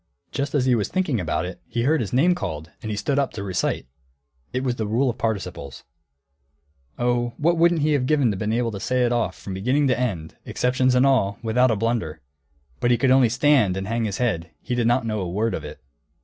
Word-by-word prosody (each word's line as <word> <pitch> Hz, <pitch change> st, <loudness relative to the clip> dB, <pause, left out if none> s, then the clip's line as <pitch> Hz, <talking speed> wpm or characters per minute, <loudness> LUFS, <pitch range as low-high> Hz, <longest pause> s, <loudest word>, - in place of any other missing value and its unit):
Just 140 Hz, +2 st, -2 dB
as 130 Hz, -3 st, +2 dB
he 130 Hz, -, +3 dB
was 110 Hz, -4 st, +1 dB
thinking 175 Hz, -, 0 dB
about 80 Hz, -1 st, -1 dB
it, 90 Hz, 0 st, -8 dB
he 115 Hz, -, -2 dB
heard 150 Hz, +2 st, +2 dB
his 105 Hz, -, -4 dB
name 160 Hz, +9 st, +4 dB
called, 80 Hz, -, -5 dB
and 110 Hz, -, -5 dB
he 105 Hz, -, -3 dB
stood 140 Hz, +6 st, 0 dB
up 140 Hz, -, -1 dB
to 100 Hz, -, -5 dB
recite. 95 Hz, -2 st, -1 dB, 0.7 s
It 130 Hz, +1 st, -2 dB
was 125 Hz, -2 st, -1 dB
the 110 Hz, -, -2 dB
rule 120 Hz, +5 st, +1 dB
of 115 Hz, -, -13 dB
participles. 90 Hz, -, -4 dB, 1.1 s
Oh, 120 Hz, 0 st, 0 dB
what 170 Hz, +3 st, +2 dB
wouldn't 170 Hz, -2 st, +3 dB
he 155 Hz, 0 st, +2 dB
have 130 Hz, -3 st, +1 dB
given 145 Hz, -6 st, +3 dB
to -, -, -3 dB
be 110 Hz, +3 st, -1 dB
able 120 Hz, -1 st, 0 dB
to 100 Hz, -, -6 dB
say 125 Hz, +4 st, 0 dB
it 120 Hz, -, 0 dB
off 120 Hz, -1 st, -1 dB
from 95 Hz, -, -7 dB
beginning 130 Hz, +10 st, +1 dB
to 125 Hz, -, +1 dB
end, 90 Hz, -11 st, -3 dB
exceptions 130 Hz, 0 st, +1 dB
and 125 Hz, +2 st, +4 dB
all, 110 Hz, -8 st, +2 dB
without 125 Hz, +3 st, +3 dB
a 110 Hz, -, +2 dB
blunder! 105 Hz, -8 st, -2 dB, 0.6 s
But 120 Hz, -, +1 dB
he 120 Hz, -, +4 dB
could 130 Hz, 0 st, +2 dB
only 130 Hz, -3 st, +5 dB
stand 125 Hz, -6 st, +3 dB
and 95 Hz, 0 st, -4 dB
hang 115 Hz, +1 st, -1 dB
his 100 Hz, -3 st, -3 dB
head; 90 Hz, -10 st, -1 dB
he 125 Hz, -, -4 dB
did 120 Hz, -2 st, +1 dB
not 120 Hz, 0 st, +2 dB
know 110 Hz, -1 st, -2 dB
a 90 Hz, -3 st, -3 dB
word 110 Hz, +5 st, -1 dB
of 80 Hz, -, -4 dB
it. 75 Hz, -, -9 dB
120 Hz, 235 wpm, -23 LUFS, 100-130 Hz, 1.1 s, only